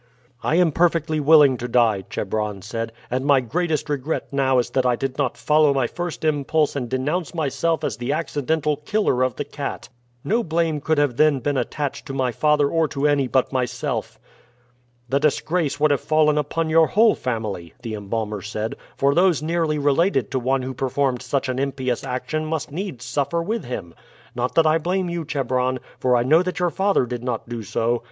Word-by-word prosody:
"I 155 - +1
am 175 -2 +4
perfectly 160 -1 +1
willing 145 -3 +6
to 120 - -4
die," 115 -5 +2
Chebron 105 -1 -3
said; 115 +2 -4 0.2
"and 130 +1 0
my 140 -1 +4
greatest 155 +6 -1
regret 145 +1 -2
now 135 -1 +2
is 120 - 0
that 130 - +1
I 125 -1 +2
did 135 +2 -4
not 135 -4 0
follow 150 -2 +3
my 135 -2 +2
first 175 +4 -5
impulse 150 0 +1
and 125 -4 -3
denounce 150 +7 -2
myself 160 +1 0
as - - -2
the 120 +3 -2
accidental 150 0 -1
killer 150 -3 0
of 130 0 +1
the 145 - -4
cat. 140 -3 -6 0.3
No 230 +3 +1
blame 160 -3 0
could 155 +1 +1
have 145 -5 +1
then 155 -2 +4
been 145 +2 -1
attached 140 +2 -3
to 135 - -5
my 130 -2 0
father 150 +3 +2
or 160 +2 +1
to 140 0 -2
any 145 -2 +2
but 130 +1 +1
myself." 125 -1 -2 0.9
"The 135 +2 +1
disgrace 155 +1 0
would 150 0 +3
have 140 - +1
fallen 155 -1 +3
upon 150 +2 -1
your 160 0 +5
whole 220 +2 +4
family," 110 -9 -4
the 115 - -4
embalmer 105 0 -3
said; 110 +2 -4 0.2
"for 140 +1 +3
those 175 -2 +3
nearly 160 -1 0
related 145 - +1
to 130 - 0
one 130 +1 0
who 130 +1 -4
performed 130 0 -1 0.2
an 130 0 -2
impious 130 -3 -2
action 140 +5 -3
must 155 -3 -3
needs 155 - -5
suffer 145 +5 -1
with 220 +5 -3
him. 100 -9 -6 0.4
Not 125 +1 -2
that 165 - +5
I 155 +1 +4
blame 180 +2 -1
you, 170 -2 -3
Chebron; 130 -2 0 0.2
for 125 -1 +2
I 120 - +3
know 155 +7 +5
that 185 0 -3
your 180 -1 +1
father 195 -7 +2
did 120 0 -5
not 125 -3 -3
do 120 -1 -5
so. 115 +3 0
140 Hz, 195 wpm, -22 LUFS, 125-155 Hz, 0.9 s, willing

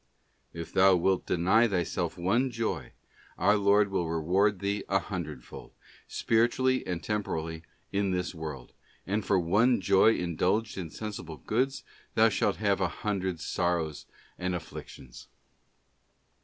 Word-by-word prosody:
If 85 0 -8
thou 95 0 +6
wilt 95 +2 +1
deny 95 +7 +3
thy 95 -5 0
self - - -3
one 110 +10 +1
joy, 110 - -3 0.4
our 105 +3 +4
Lord 100 0 +3
will 90 -4 -1
reward 95 +6 +2
thee 100 +2 -2
a 95 - +3
hundredfold, 80 -10 -6 0.3
spiritually 125 +3 +1
and 85 -2 -3
temporally, 80 -6 -3 0.3
in 100 0 0
this 90 -1 -2
world; 75 -6 -7 0.3
and 105 +3 -1
for 95 -1 +2
one 105 +9 +3
joy 100 +4 +4
indulged 90 +6 0
in 90 -4 -5
sensible 85 -5 -7
goods 130 - -1 0.3
thou - - +6
shalt - - +1
have - - 0
a - - +3
hundred 95 -4 -3
sorrows 85 -3 -2 0.3
and 90 0 -1
afflictions. 75 -6 -9
95 Hz, 135 wpm, -29 LUFS, 85-105 Hz, 0.4 s, thou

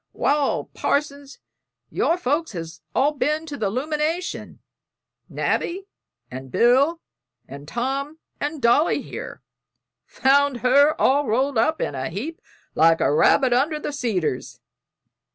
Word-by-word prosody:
"Wal, 285 -1 +1
Parson, 285 -1 -1 0.6
your 335 - +1
folks 310 -3 -1
has 165 -1 -7
all 280 +3 +3
ben 305 +2 -1
to 300 -3 -6
the 210 -7 -1
'lumination 305 - -3 0.7
Nabby 380 +3 -2 0.5
and 130 +1 -8
Bill 270 - +3 0.5
and 140 +1 -10
Tom 275 - -3 0.2
and 290 -2 -4
Dolly 265 +8 +3
here; - - -8 0.6
found 275 -2 +2
her 280 +5 +4
all 280 +1 +3
rolled 255 +3 +1
up 315 +8 +1
in - - -2
a 130 +1 -4
heap 260 - -6 0.3
like 165 0 +4
a - - +2
rabbit 255 - +4
under 290 +5 +1
the 295 - -5
cedars." 190 - -2
275 Hz, 125 wpm, -23 LUFS, 225-300 Hz, 0.7 s, her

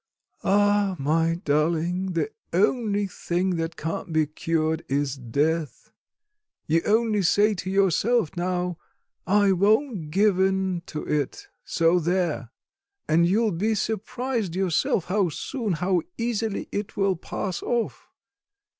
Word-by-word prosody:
Ah, 205 -1 +3
my 160 +4 +1
darling, 170 +5 +1
the 170 +6 -1 0.2
only 205 +2 +2
thing 185 0 -1
that 165 0 -3
can't 165 +3 -4
be 160 -1 +3
cured 160 +1 -1
is 140 0 0
death. 145 +5 -2 0.7
You 165 +1 +2
only 220 -1 +2
say 205 +4 +3
to 185 -1 -5
yourself 195 +2 +2
now: 180 -1 -2 0.5
'I 200 +1 +4
won't 205 - +2
give 195 +3 +3
in 190 -2 +1
to 150 - -5
it 145 -3 -2
so 165 +2 +2
there!' 170 -7 -1 0.6
and 170 +2 +4
you 200 +6 +2
will 220 - +2
be 210 +6 0
surprised 220 -1 -2
yourself 185 -1 +1
how 190 -1 +1
soon, 220 - -3
how 180 +2 +1 0.2
easily 225 -3 -2
it 205 0 -4
will 195 -1 +2
pass 180 +2 -4
off. 240 -2 -2
185 Hz, 130 wpm, -25 LUFS, 165-205 Hz, 0.7 s, I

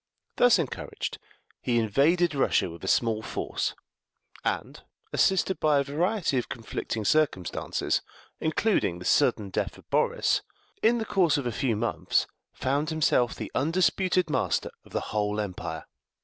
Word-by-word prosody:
Thus 245 -3 +6
encouraged, 160 -7 -4 0.4
he 120 -1 +1
invaded 150 - +3
Russia 135 -9 +2
with 85 +2 -11
a - - -4
small 110 +1 +2
force, - - -3 0.7
and, - - -2 0.3
assisted 190 -2 +2
by 150 -2 +3
a 140 - +3
variety 165 - 0
of 120 - -5
conflicting 110 -1 -4
circumstances, 120 - +1 0.4
including 160 - +1
the 90 - -9
sudden 100 -3 +2
death - - -2
of - - -18
Boris, - - +2 0.4
in 235 +2 +4
the 225 - -2
course 175 -8 +3
of 140 - -3
a 120 - 0
few 115 0 0
months 115 +3 0 0.3
found 140 +4 -1
himself 150 -6 +2
the - - -6
undisputed 180 +3 +2
master 155 - 0
of - - -19
the - - -1
whole 105 0 0
empire. 90 -6 -4
140 Hz, 145 wpm, -27 LUFS, 110-170 Hz, 0.7 s, Thus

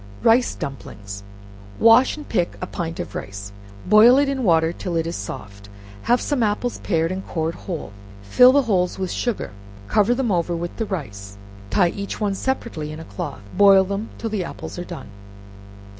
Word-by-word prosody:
Rice 240 +2 +4
Dumplings 100 -7 -7 0.6
Wash 230 +6 +6
and 300 - -9
pick 175 -6 -1
a - - -3
pint 165 -2 -5
of - - -5
rice, 100 +1 -7 0.3
boil 215 +6 +7
it 285 0 +3
in 270 -2 -2
water 165 -4 +3
till 175 -1 -4
it 165 0 0
is 165 - -3
soft; 100 0 -8 0.3
have 245 - +2
some 285 -4 -1
apples 220 +3 -1
pared 165 -3 0
and 190 +1 -4
cored 160 -1 -2
whole, 165 - -6 0.3
fill 250 - +6
the 285 +1 +4
holes 185 -6 0
with 190 -2 -3
sugar, 240 - -2 0.4
cover 215 - +3
them 245 -4 0
over 175 -1 0
with 170 +1 -5
the 225 - -1
rice, 100 - -6 0.3
and 100 - -18
tie 180 -4 +4
each 200 +2 -5
one 205 -2 0
separately 195 -9 -3
in 155 - -7
a 160 - -9
cloth; 100 0 -6
boil 195 -1 +7
them 200 +3 -4
till 225 - -4
the 205 -4 -1
apples 175 - -7
are - - -3
done. 130 -9 -8
185 Hz, 190 wpm, -22 LUFS, 160-225 Hz, 0.6 s, boil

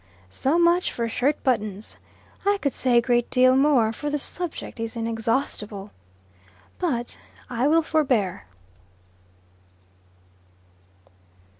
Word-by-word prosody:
So 270 - +1
much 345 +1 +3
for 235 -1 -2
shirt 265 +6 0
buttons. 215 -5 -2 0.5
I 405 0 +2
could 280 -6 -1
say 250 -2 +2
a - - +6
great 240 -1 +1
deal 255 0 +4
more, 265 -5 +3
for 295 +6 -4
the 295 - 0
subject 330 -3 -5
is 225 +1 -4
inexhaustible. 225 -3 -2 0.9
But 245 -10 -2 0.3
I 245 +3 +1
will 325 +2 +4
forbear. 250 - 0
250 Hz, 110 wpm, -24 LUFS, 225-295 Hz, 0.9 s, a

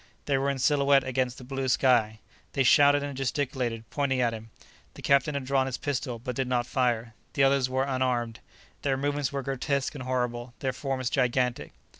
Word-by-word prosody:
They 140 - +1
were 140 +1 0
in 140 - -1
silhouette 140 0 +3
against 130 -1 -1
the - - -10
blue 135 +1 -3
sky. 120 -4 +3 0.4
They 135 - +2
shouted 145 +2 +5
and 145 -1 -5
gesticulated, 125 -4 -2
pointing 140 -3 0
at 120 -2 +2
him. 110 0 -8 0.5
The - - -11
captain 140 +1 +3
had 140 -2 -3
drawn 135 0 +1
his 130 - -3
pistol, 130 -4 -3
but 125 +2 -5
did 135 0 -1
not 125 -1 0
fire; 120 -3 0 0.2
the 135 - +2
others 135 -1 +3
were 130 +1 +1
unarmed. 125 -4 -1 0.4
Their 135 -2 0
movements 145 0 -1
were 140 -1 -3
grotesque 135 +1 -1
and 140 -3 -7
horrible, 125 -1 -2
their 130 -1 -2
forms 130 -1 -3
gigantic. 125 -1 0
130 Hz, 190 wpm, -27 LUFS, 125-140 Hz, 0.5 s, shouted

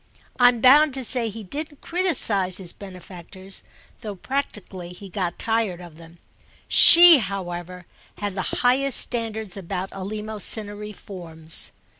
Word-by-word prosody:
I'm 245 -2 +3
bound 280 +3 +5
to 265 - -4
say 240 -1 0
he 220 +1 -9
didn't 290 - -8
criticise 220 - +2
his 180 -3 -3
benefactors, 185 0 -7 0.4
though 210 -4 -7
practically 190 -7 -6
he 195 +2 -12
got 180 -2 -4
tired 225 -6 -2
of 170 -3 -13
them; 165 +1 -16 0.5
she, 340 -3 +8
however, 180 -3 -7 0.3
had 205 -1 -5
the 190 - -4 0.2
highest 265 +2 +2
standards 220 -4 -1
about 190 0 -6
eleemosynary 210 +1 -4
forms. 165 -4 -6
205 Hz, 125 wpm, -22 LUFS, 180-240 Hz, 0.5 s, she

